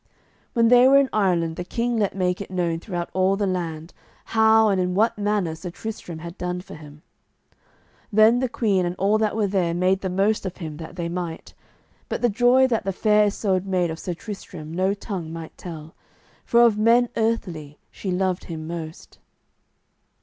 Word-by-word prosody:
When 230 -2 +3
they 245 +1 +7
were 275 +1 +6
in 275 -1 +3
Ireland 175 -6 +1
the 180 - -3
king 235 +6 -2
let 205 -3 0
make 180 0 0
it 200 - -7
known 175 -3 -1
throughout 175 -2 -5
all 190 +1 +2
the 200 0 -1
land, 170 -3 -4 0.3
how 220 0 +4
and 190 -2 +1
in 180 0 -1
what 220 +4 +2
manner 205 -5 -1
Sir 165 +3 -7
Tristram 180 -3 -7
had 170 +2 -9
done 180 0 -3
for - - -12
him. 150 -1 -13 1.1
Then 220 +3 +5
the 260 -1 -1
queen 205 -6 +1
and 175 0 -2
all 200 +3 +2
that 215 -1 0
were 220 -2 +1
there 185 -4 0
made 185 +2 +1
the 190 - -2
most 200 +4 +1
of 185 -2 -5
him 155 -4 -7
that 160 0 -9
they 170 -1 -3
might. 170 -1 -5 0.6
But - - -3
the 240 - +4
joy 245 +4 +4
that 235 -4 0
the 195 - -1
Fair 210 +2 +3
Isoud 195 -2 -1
made 180 -3 0
of 160 - -6
Sir 180 - -4
Tristram 175 -5 -8
no 190 +3 +1
tongue 190 -6 -6
might 165 -1 -8
tell, 160 -2 -9 0.5
for 235 - +4
of 220 -3 +4
men 235 +3 +4
earthly 180 -10 -2
she 195 - -6
loved 185 0 -1
him 160 -2 -6
most. 165 -1 -8
190 Hz, 195 wpm, -23 LUFS, 170-215 Hz, 1.1 s, they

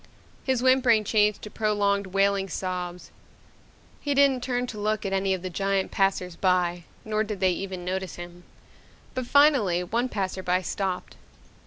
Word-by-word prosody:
His 260 -2 0
whimpering 255 -4 +4
changed 210 0 +2
to 210 - -7
prolonged 205 -2 +1
wailing 195 0 +1
sobs. 180 0 -4 0.9
He 285 -1 -1
didn't 275 -2 +4
turn 245 0 -1
to 225 -4 -7
look 215 0 -1
at 195 - -2
any 195 0 +1
of 185 - -9
the 185 - -3
giant 195 +1 0
passers 190 -3 0
by 175 -2 +1 0.2
nor 215 0 0
did 210 -2 -5
they 185 0 +3
even 185 0 -5
notice 190 -1 -3
him. 175 0 -10 0.7
But 255 -2 -3
finally 260 - +4
one 235 +7 -1
passer 190 -3 -3
by 180 0 0
stopped. 185 +1 -3
195 Hz, 160 wpm, -26 LUFS, 185-220 Hz, 0.9 s, whimpering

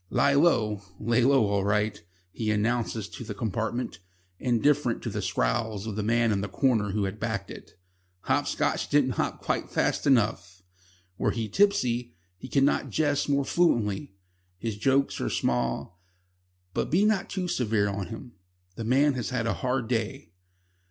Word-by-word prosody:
"Lie 140 - +3
Low 115 - +3 0.2
lay 115 +2 +2
low 135 -3 +4
all 100 -1 0
right," 105 -1 0 0.3
he 110 +2 -3
announces 110 0 0
to - - -8
the 105 -2 -6
compartment, 110 -2 -3 0.4
indifferent 125 +1 +1
to - - -3
the - - -3
scowls 100 - -1
of 110 -2 -4
the 110 - -1
man 115 +2 +2
in 100 -2 0
the 100 - -3
corner 110 -2 +1
who 100 +1 -1
had 100 +2 -3
backed 110 -4 -3
it. - - -11 0.5
"Hopscotch - - 0
didn't 145 -3 +3
hop - - -2
quite - - -1
fast - - 0
enough." 100 -8 +1 0.6
Were - - +2
he 115 -2 -2
tipsy, 125 - +1 0.2
he 110 - -10
could 135 +1 +2
not 145 - +1
jest 145 -2 0
more 140 -1 +2
fluently. 120 - +1 0.4
His 110 +2 -3
jokes 135 +5 +1
are - - -1
small, 65 +8 -1 0.7
but - - -1
be 190 +6 +3
not 215 -4 +1
too 185 -2 -2
severe 110 -10 +1
on 100 -1 -3
him. 120 +2 -8 0.5
The 115 - -4
man 135 +5 +3
has 125 -3 -3
had 125 -3 -1
a 115 - +1
hard 125 -2 -1
day. 115 +3 -2
115 Hz, 165 wpm, -27 LUFS, 105-135 Hz, 0.7 s, low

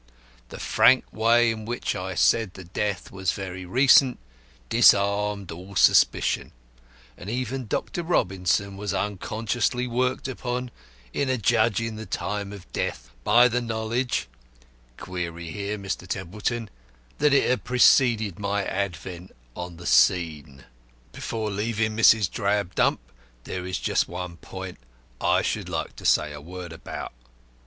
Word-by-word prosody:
The - - -9
frank 130 0 +4
way 115 +1 +4
in 110 -1 -5
which 120 +3 -3
I 95 0 -4
said 110 +1 +2
the 95 - -9
death 95 +2 -3
was 95 -2 -1
very 95 -1 -6
recent 130 - +5 0.5
disarmed 100 +3 +3
all 90 +4 -10
suspicion, - - +3 0.6
and 95 - -9
even 130 +1 -3
Dr. 175 - -2
Robinson 95 - 0
was 100 -1 -3
unconsciously 115 +5 -1
worked 125 +2 -1
upon, 125 -1 -4 0.4
in 140 - 0
adjudging 115 -2 +1
the 110 -1 -7
time 100 +2 -3
of 100 -3 -11
death, - - -3
by 120 - +6
the 125 0 0
knowledge 115 - -2 0.7
(query 85 -2 -5
here, 105 +2 -4
Mr. 100 -2 -5
Templeton) 105 +5 -3 0.5
that 150 0 +4
it 140 - +4
had 125 - +1
preceded 115 -5 +4
my 100 0 -1
advent 90 -1 -4 0.2
on 90 -1 -7
the 85 - -11
scene. 75 -1 +2 0.5
"Before 110 -2 -4
leaving 110 +1 -1
Mrs. 110 -2 +5
Drabdump, 100 -1 +1 0.5
there 90 +5 -5
is 90 -2 -2
just - - 0
one 90 -1 -6
point 95 -3 -8 0.4
I - - +3
should - - -2
like - - -4
to - - -10
say 75 -1 +3
a 75 - -9
word 90 +1 -8
about. 85 - -7
100 Hz, 135 wpm, -25 LUFS, 90-115 Hz, 0.7 s, by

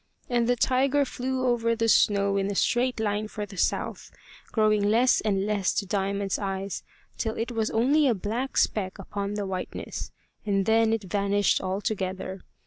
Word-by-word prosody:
And 240 -1 +2
the 245 - +4
tiger 270 +3 +2
flew 260 0 -2
over 230 -2 +2
the 230 0 0
snow 200 -2 +3
in 195 0 0
a 200 - -3
straight 250 +3 +1
line 210 0 -1
for 210 -1 -5
the 200 -1 -12
south, 180 - -1 0.4
growing 215 -2 +3
less 230 +5 +4
and 200 -2 0
less 205 -3 +1
to 200 - 0
Diamond's 200 0 -1
eyes 195 -1 -3 0.4
till 220 -1 -2
it 230 +2 -2
was 225 -2 -1
only 280 +6 +3
a 240 - +3
black 225 +7 -3
speck 190 -2 +1
upon 200 +1 -4
the 205 -1 -2
whiteness; 185 -1 -5 0.3
and 195 -2 +1
then 225 +1 +3
it 225 -2 0
vanished 200 +1 +1
altogether. 190 -1 -3
210 Hz, 170 wpm, -26 LUFS, 200-230 Hz, 0.4 s, the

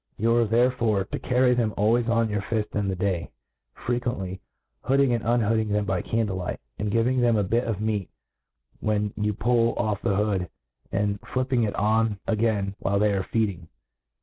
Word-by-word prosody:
You 115 +2 +2
are 120 - +4
therefore 115 -2 +2
to - - -6
carry 125 0 +3
them 115 -3 0
always 115 +3 +2
on 115 -1 +2
your 105 -2 -2
fift 110 +1 -2
in 105 -1 0
the 95 - -1
day, 95 -2 -1 0.6
frequently 120 -7 -2 0.4
hooding 135 -1 +3
and 115 - -1
un 120 +2 +2
hooding 110 0 +1
them 105 0 0
by 95 -3 0
candle 110 -4 -1
light, 90 -1 -4 0.2
and 105 - -1
giving 120 +4 +2
them 120 -1 +3
a 105 - +2
bit 115 +6 0
of 110 -4 -2
meat 105 -3 -1 0.7
when 105 -1 0
you 105 -1 -1
pull 115 +2 +2
oflF 105 -3 -1
the 100 - +1
hood, 100 -4 0 0.4
and 100 0 0 0.2
flipping 130 -2 +1
it 105 - -3
on 110 0 +1
again 105 -3 0
while 100 +1 0
they 105 0 +3
are 95 -1 -2
feeding. 100 -7 -1
110 Hz, 185 wpm, -25 LUFS, 100-115 Hz, 0.7 s, are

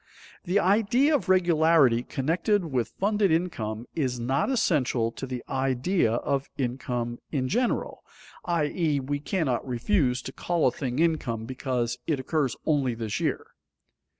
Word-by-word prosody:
The 180 +3 +1
idea 225 - +3
of 275 -9 0
regularity 160 -8 +4
connected 170 - 0
with 125 -7 -2
funded 205 0 +2
income 120 -10 -1
is 130 -6 -1
not 135 - 0
essential 135 - +1
to 135 - -7
the 125 -1 -5
idea 130 - +1
of 135 +3 -1
income 120 -2 -3
in 130 -4 0
general, 240 - -1 0.4
i.e., 160 -2 0
we 145 +2 -3
cannot 150 -5 -1
refuse 125 - +1
to - - -6
call 175 -2 0
a 130 - +4
thing 125 -2 -4
income 150 -9 0
because 125 -1 -2
it 155 -5 0
occurs 135 -1 0
only 140 -6 +1
this 115 -2 -3
year. - - -1
140 Hz, 140 wpm, -26 LUFS, 125-175 Hz, 0.4 s, regularity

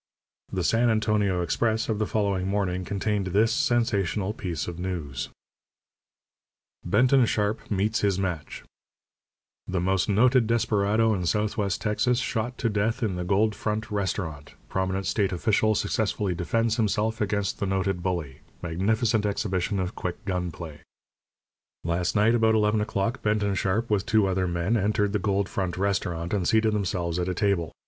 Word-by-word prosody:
The 95 -2 -1
San 115 +5 +3
Antonio 105 -4 +1
Express 110 +6 0
of 110 -2 -1
the 110 - 0
following 100 -3 0
morning 95 -2 -1
contained 100 +1 -1
this 110 +5 +2
sensational 110 - +1
piece 85 -8 -4
of 85 -1 -6
news: 85 -7 -4 1.5
BENTON 130 0 +4
SHARP 105 0 -1
MEETS 105 +2 +1
HIS 100 -2 +1
MATCH 90 -7 -4 1.0
THE 95 -1 -1
MOST 95 +2 +1
NOTED 120 +3 +4
DESPERADO 110 -1 +2
IN 90 -4 -2
SOUTHWEST 105 -1 0
TEXAS 120 +4 +1
SHOT 120 0 -2
TO 115 - 0
DEATH 110 +4 0
IN 100 -5 0
THE 90 - -3
GOLD 100 +4 +2
FRONT 110 +1 -3
RESTAURANT 90 -7 -3
PROMINENT 95 +1 -1
STATE 100 -3 0
OFFICIAL 110 +4 +2
SUCCESSFULLY 105 -3 0
DEFENDS 115 +6 0
HIMSELF 110 0 0
AGAINST 100 -1 -1
THE 100 - -1
NOTED 95 -1 -1
BULLY 85 -7 -3 0.2
MAGNIFICENT 105 +6 +1
EXHIBITION 100 -2 -1
OF 90 +2 -2
QUICK 90 +1 -5
GUN 90 -2 -1
PLAY. 80 -3 -9 1.0
Last 85 +3 -1
night 105 +2 +4
about 110 -1 +3
eleven 105 0 +2
o'clock 105 +3 -1
Benton 105 -1 +1
Sharp, 95 +4 0
with 100 -2 +1
two 110 -2 +3
other 95 -1 0
men, 85 +5 0
entered 105 -1 +1
the 105 - +1
Gold 100 0 0
Front 95 -1 -3
Restaurant 90 -3 -1
and 95 -4 0
seated 110 -1 +3
themselves 90 -4 -1
at 90 +1 -1
a 90 - -2
table. 90 -5 0
100 Hz, 155 wpm, -26 LUFS, 90-110 Hz, 1.5 s, BENTON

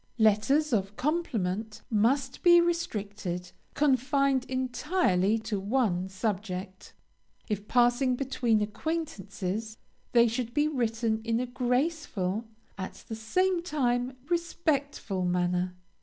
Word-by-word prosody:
LETTERS 240 +7 +3
OF 200 -1 0
COMPLIMENT 225 - -2
must 255 +5 +1
be 345 -1 +7
restricted, 205 - -2 0.2
confined 275 -1 +2
entirely 255 - +1
to 220 -2 -3
one 195 -4 0
subject. 190 -2 -4 0.5
If 210 -1 -3
passing 245 +1 +3
between 245 -4 +1
acquaintances, 215 - -4 0.3
they 235 -1 +6
should 235 +1 -3
be 295 0 +3
written 230 -5 0
in 230 0 0
a 250 - 0
graceful, 250 - -1 0.3
at 190 - -7
the 220 - -3
same 360 +12 +1
time 255 -6 0
respectful, 295 - -1
manner. 180 0 0
235 Hz, 105 wpm, -29 LUFS, 205-275 Hz, 0.5 s, be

